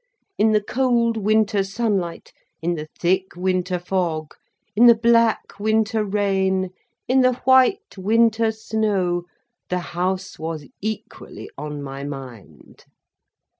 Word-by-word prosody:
In 220 +1 +4
the 210 -1 +2
cold 240 -1 +1
winter 215 -1 +2
sunlight, 195 -4 -2 0.3
in 170 +2 -1
the 155 -2 -5
thick 185 +2 0
winter 185 0 0
fog, 175 -4 -2 0.4
in 235 +3 +7
the 235 - +8
black 230 -2 +2
winter 220 +1 +1
rain, 190 -2 0 0.4
in 260 +1 +4
the 255 0 +4
white 260 +11 +4
winter 225 +2 +3
snow, 205 -5 -1 0.4
the 180 - 0 0.2
House 185 +2 -2
was 160 -2 -5 0.2
equally 215 +1 -6
on 150 0 -6
my 135 0 -6
mind. 130 - -10
195 Hz, 120 wpm, -22 LUFS, 175-220 Hz, 0.4 s, the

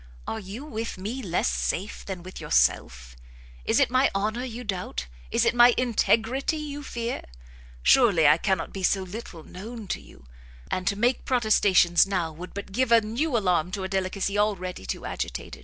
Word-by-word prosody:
are 225 - -4
you 215 +7 -8
with 225 -7 -5
me 215 +8 -4
less 180 -6 0
safe 195 +4 -2
than 185 -3 -6
with 185 +1 -9
yourself? - - +1 0.5
is - - +3
it - - +3
my 255 +2 +4
honour 215 +5 -1
you 245 -1 -6
doubt? 180 - -4 0.2
is - - +2
it - - +3
my 240 0 +6
integrity 250 +4 +1
you 290 -1 -5
fear? 235 -3 -4 0.6
Surely 200 - +5
I 150 - +6
cannot 190 -3 -1
be 195 - -5
so 190 +1 +2
little 185 -4 -8
known 220 +6 -9
to - - -2
you; 70 - -17 0.5
and 185 -1 -2
to 200 - +2
make 240 +4 +1
protestations 200 -8 +4
now, 180 -5 -1
would 175 +4 -10
but 200 -1 -6
give 250 +3 0
a 230 - +8
new 240 +6 -1
alarm 180 -5 +1
to 195 - -3
a - - -2
delicacy 195 +1 -1
already 190 -4 -1
too - - -4
agitated. - - -5
205 Hz, 180 wpm, -26 LUFS, 185-240 Hz, 0.6 s, a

